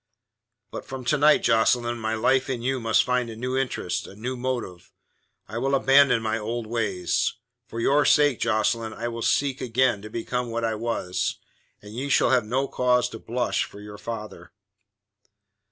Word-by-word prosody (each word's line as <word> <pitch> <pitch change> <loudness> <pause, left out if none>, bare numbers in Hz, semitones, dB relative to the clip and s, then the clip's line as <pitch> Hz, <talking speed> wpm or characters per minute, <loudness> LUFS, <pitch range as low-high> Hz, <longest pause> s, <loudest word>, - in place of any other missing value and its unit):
"But - - -6
from 130 -2 -8
to 150 - +2
night, 150 +1 +5
Jocelyn, 120 +1 +2
my 110 0 -1
life 130 +4 +2
in 120 -3 -3
you 130 +1 0
must 115 -2 +3
find 125 -1 0
a 115 - -7
new 125 +3 -3
interest, 125 -9 -2
a - - -12
new 125 +5 -4
motive. 120 -9 -4 0.6
I 110 +4 -5
will 135 +2 +1
abandon 135 -3 +4
my 110 0 -1
old 115 +2 -4
ways. 110 0 -1 0.3
For 115 - -6
your 140 +5 +3
sake, 145 -5 +4
Jocelyn, 110 +1 0
I 115 +2 -4
will 115 0 -6
seek 140 +2 +1
again 120 -3 +1
to 110 - -9
become 120 +2 -3
what 115 0 -2
I 115 - 0
was, 110 -5 -2 0.5
and 105 0 -11
you 135 +5 -4
shall - - +3
have 125 -4 +3
no 130 +5 0
cause 125 -1 +1
to 115 - -9
blush 120 +2 -1
for 100 - -13
your 105 0 -10
father." 110 -2 -7
120 Hz, 180 wpm, -25 LUFS, 110-130 Hz, 0.6 s, night